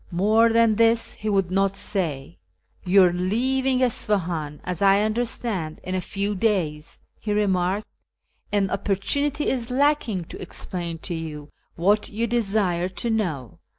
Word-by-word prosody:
More 215 +6 +3
than 230 -2 +4
this 230 0 +3
he 215 - -4
would 195 -3 +1
not 195 +1 +1
say. 145 - -3 0.2
" - - -35
You 190 +1 +6
are 175 -1 +4
leaving 255 +8 +1
Isfahan, 175 - -1
as 180 0 -4
I 200 +1 +5
understand, 215 -7 -2
in 185 - -4
a 185 - 0
few 200 +3 -2
days," 180 -8 -1 0.2
he 210 - -4
remarked, 195 0 +1 0.4
" - - -42
and 200 -2 +1
opportunity 280 +10 0
is 245 -2 -1
lacking 255 - +1
to - - -9
explain 170 -2 -5
to 180 - -3
you 155 -3 -6 0.3
what 205 +5 +2
you 225 +3 -1
desire 200 -6 0
to 230 +5 -3
know. 155 - -2
200 Hz, 150 wpm, -24 LUFS, 180-225 Hz, 0.4 s, You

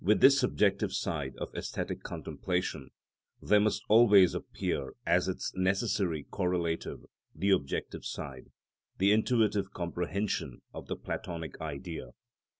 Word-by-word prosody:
With 105 +1 +4
this 135 +4 +7
subjective 105 -6 +2
side 70 -5 -2
of - - -5
æsthetic - - -4
contemplation, 90 -7 -3 0.5
there 105 - +4
must 105 0 +1
always 105 -5 +7
appear 65 - -3
as - - +3
its - - -3
necessary 95 -4 0
correlative 90 -3 -2 0.3
the 100 +1 +1
objective 70 -7 -1
side, 65 -2 -6 0.5
the 100 +2 +4
intuitive 105 -3 +2
comprehension 90 +4 -3
of - - -8
the - - -2
Platonic 80 -4 -6
Idea. 80 +2 -6
95 Hz, 120 wpm, -31 LUFS, 80-105 Hz, 0.5 s, this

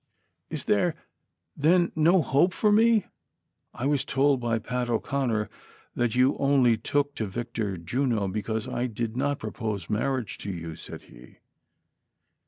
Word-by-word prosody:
" - - -51
Is - - -5
there, - - +2 0.6
then, 170 +4 +3
no 165 +2 +4
hope 160 +8 +3
for 210 - +3
me 225 +1 +5
V - - -25 0.7
I 125 - -4
was 145 -1 +2
told 135 0 +2
by 120 -2 0
Pat 125 +2 -3
O'Conner 120 -2 0 0.5
that 120 -2 0
you 130 +2 +4
only 135 -4 +4
took 145 +5 -1
to 110 - -3
Victor 110 -2 -3
Juno 110 +4 -1
because 110 +2 -3
I 125 - -1
did 115 0 -4
not 140 +2 0
propose 110 -4 -4
marriage 120 0 -1
to 100 - -6
you," 85 -3 -6
said - - -10
he. - - -16
120 Hz, 155 wpm, -27 LUFS, 110-140 Hz, 0.7 s, me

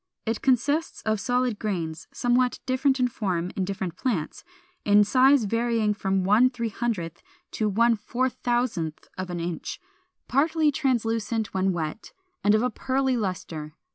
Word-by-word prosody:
It 225 -1 -2
consists 285 +5 +1
of 215 -1 0
solid 245 -1 0
grains, 170 -6 -3
somewhat 245 +1 +1
different 265 +1 +1
in 250 - +3
form 185 -7 -2
in 190 - 0
different 190 -3 -4
plants, 195 -12 -2 0.4
in 205 0 +6
size 260 +4 +5
varying 230 0 +1
from 195 -2 0
1/300 225 -4 +1 0.3
to 215 -1 0
1/4000 235 -4 0 0.3
of 185 -1 -4
an 175 -1 -3
inch, 170 -1 -4 0.5
partly 310 +3 +2
translucent 230 -5 -1
when 190 0 +1
wet, 165 +3 -4 0.3
and 205 +1 +5
of 215 - +2
a 250 - +1
pearly 265 +2 0
lustre. 170 -8 -4
225 Hz, 135 wpm, -26 LUFS, 190-250 Hz, 0.5 s, in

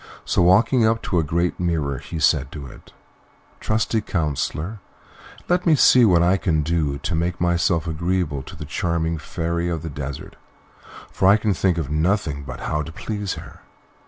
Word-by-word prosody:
So - - +1
walking 110 +8 +4
up 110 +1 +2
to 90 - 0
a - - +1
great 85 +3 -1
mirror, 80 -6 -1
he - - -7
said 70 -3 +2
to 75 -3 -7
it, 65 - -14 0.7
"Trusty 110 +1 0
counsellor, 80 +4 -2 0.7
let 180 0 +1
me 160 - +6
see 125 -3 +6
what 85 -5 +4
I 90 +2 +3
can 80 -5 0
do 75 -3 0
to 90 +4 -4
make 85 +2 -1
myself 85 -1 +1
agreeable 85 -2 -1
to - - -11
the 75 - -7
charming 80 +2 -1
Fairy 85 +2 -2
of 80 -2 -3
the 80 - -5
Desert; 70 -1 -7 0.7
for 95 - +1
I 100 +2 +7
can 105 -1 0
think 90 -1 +1
of 75 -4 -3
nothing 80 -2 0
but 65 -3 -8
how 75 - -1
to 80 - -7
please 100 +2 -4
her." - - -11
85 Hz, 180 wpm, -22 LUFS, 75-95 Hz, 0.7 s, I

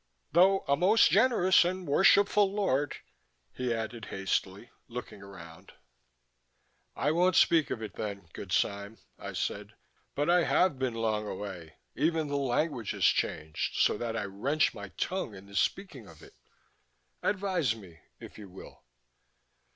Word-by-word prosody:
Though 190 +4 +4
a 140 - +3
most 185 +3 +4
generous 195 -3 +4
and 185 +1 -3
worshipful 200 +5 +4
lord," 145 -9 0 0.6
he 125 -1 -3
added 115 0 -4
hastily, 95 +2 -3 0.2
looking 120 -4 -8
around. 90 -2 -13 1.2
"I 145 - 0
won't 180 +3 +2
speak 165 -3 +4
of 115 - -4
it 105 -3 -7
then, 100 -4 -6
good - - -8
Sime," 100 +2 -1 0.2
I - - -7
said. - - -4 0.4
"But 145 +1 0
I 175 0 +4
have 180 -8 +2
been 130 -3 -1
long 110 -2 -1
away. 95 -6 -7 0.2
Even 160 -2 0
the 145 - -2
language 135 -3 -1
has - - 0
changed, 75 0 0
so - - +3
that 115 -1 -3
I - - -2
wrench 130 +11 0
my 100 -2 -8
tongue 150 - -4
in 95 0 -12
the 100 0 -13
speaking 135 - -2
of 80 -2 -16
it. - - -16 0.9
Advise 185 - 0
me, 90 -7 -14 0.2
if - - -12
you 100 -2 -10
will." 95 - -13
125 Hz, 150 wpm, -29 LUFS, -, 1.2 s, Though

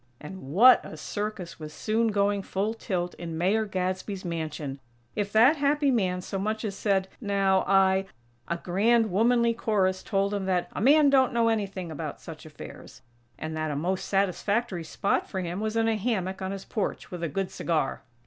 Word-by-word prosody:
And, 190 +6 -9
what 205 - +6
a - - -9
circus 205 -5 -5
was 155 -1 -7
soon 220 +8 0
going 200 -1 +1
full 200 +3 -2
tilt 180 -6 -3
in 165 -2 -5
Mayor 200 +6 +2
Gadsby's 185 0 -3
mansion! 155 -5 -4 0.4
If 205 -1 -2
that 245 +9 +5
happy 285 0 +2
man 185 -6 0
so 195 +1 -4
much 215 +3 -2
as 200 -2 -3
said: 195 -2 +1
"Now, 195 -3 +2
I 195 0 +3 0.2
" 120 - -36
a 170 - -1
grand, 215 +5 +2
womanly 235 +4 +3
chorus 190 -5 0
told 200 0 0
him 200 -2 -2
that 180 -2 0
"a - - -4
man 285 +4 +6
don't 265 -2 +4
know 230 -1 +3
anything 195 -6 -2
about 155 -1 -5
such 160 -1 -10
affairs;" 140 -3 -11 0.3
and 155 0 -5
that 155 0 -2
a 145 - -2
most 180 +6 -1
satisfactory 200 0 0
spot 195 +5 -1
for 190 - -3
him 175 +1 -3
was 220 +1 -2
in 225 0 +2
a 225 -1 +1
hammock 190 -4 -2
on 190 - -2
his 195 -1 -6
porch, 210 - -3
with 180 -2 -6
a 170 - -1
good 190 +5 -2
cigar! 160 -5 -1
195 Hz, 190 wpm, -27 LUFS, 180-220 Hz, 0.4 s, what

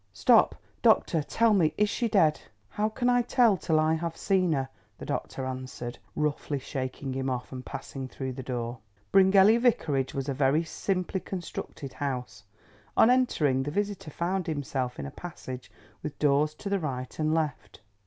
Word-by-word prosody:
Stop, 100 - +5 0.3
doctor, 160 - +4
tell 225 +9 +2
me, 170 -6 +3
is 210 - +3
she 235 +3 -1
dead?" 165 -9 +3 0.3
"How 210 +1 0
can 245 +3 -1
I 245 0 +4
tell 240 -3 +4
till 160 -3 +1
I 155 +1 +3
have 165 0 -3
seen 185 -3 +2
her?" 135 -2 -1 0.3
the - - -8
doctor 130 - -3
answered, 130 -2 -6 0.2
roughly 150 -1 -1
shaking 135 0 -4
him 135 0 -2
off, 125 -1 -3
and 130 -1 -6
passing 135 0 -6
through 130 0 -5
the 130 - -6
door. 120 -1 -4 0.3
Bryngelly 195 +3 +6
Vicarage 150 - +1
was 135 0 -2
a 140 - 0
very 140 +4 +2
simply 185 +3 -2
constructed 175 -7 -6
house. 125 -7 -4 0.5
On 230 - +7
entering 155 - +2
the 140 - -2
visitor 200 0 -2
found 175 +4 -2
himself 135 -5 -2
in 70 - -5
a 70 - -6
passage 130 -7 -8 0.3
with 150 - -6
doors 150 +1 +2
to - - -8
the 200 0 +1
right 130 -5 -5
and 155 0 +1
left. 130 -11 -3
150 Hz, 175 wpm, -28 LUFS, 130-190 Hz, 0.5 s, On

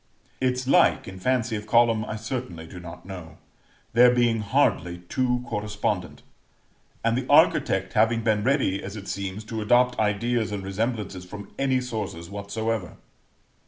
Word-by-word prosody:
Its 125 0 0
like, 170 +6 +4
in 95 0 -8
fancy 120 +1 0
of 105 0 -6
column, 115 -1 +4
I 105 - -4
certainly 110 -7 -5
do 90 +2 -10
not 85 -1 -10
know; 90 -5 -9 0.6
there 125 +1 +7
being 120 -2 +2
hardly 100 -6 +1
two 125 -1 0
correspondent, 105 -3 -3 0.8
and 115 0 +2
the 130 +1 -2
architect 95 0 +4
having 115 +1 +3
been 110 -2 +2
ready, 125 -7 +1
as 95 +2 -7
it 100 -2 -8
seems, 100 +1 -4
to 110 0 -5
adopt 125 +3 +3
ideas 110 +2 0
and 100 -2 -4
resemblances 100 -1 -3
from 100 +2 -10
any 135 -1 +2
sources 100 -8 -5
whatsoever. 105 -1 -3
110 Hz, 150 wpm, -25 LUFS, 95-120 Hz, 0.8 s, there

